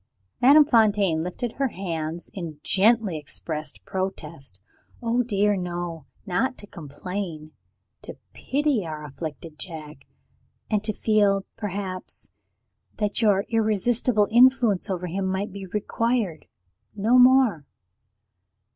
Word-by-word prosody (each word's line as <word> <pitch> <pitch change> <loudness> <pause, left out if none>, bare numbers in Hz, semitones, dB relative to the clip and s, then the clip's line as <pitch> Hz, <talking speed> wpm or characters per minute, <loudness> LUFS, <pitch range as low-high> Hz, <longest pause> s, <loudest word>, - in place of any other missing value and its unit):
Madame 290 +4 +8
Fontaine 205 - +3
lifted 180 +7 -4
her 275 - +2
hands 170 -5 -5
in 165 -6 -6
gently 205 -4 +3
expressed 150 0 -6
protest. 165 - -5 0.4
"Oh, 235 0 +1
dear, 210 -3 +1
no 175 -4 -5 0.2
not 215 +7 0
to - - -9
complain! 170 -1 -6 0.5
To - - -9 0.2
pity 280 -5 0
our 155 -2 -6
afflicted 155 +2 -8
Jack, 155 -5 -8 0.6
and 210 -1 +1
to 215 - +1
feel, 205 -3 +2
perhaps, 195 -3 -5 0.7
that 210 +2 -1
your 205 -2 +3
irresistible 220 0 +2
influence 240 -5 +4
over 180 -1 -2
him 190 +2 -2
might 190 +3 -2
be 195 0 -8
required 210 -2 -1 0.5
no 225 +5 +4
more." 250 - +5
195 Hz, 110 wpm, -25 LUFS, 170-225 Hz, 0.7 s, Madame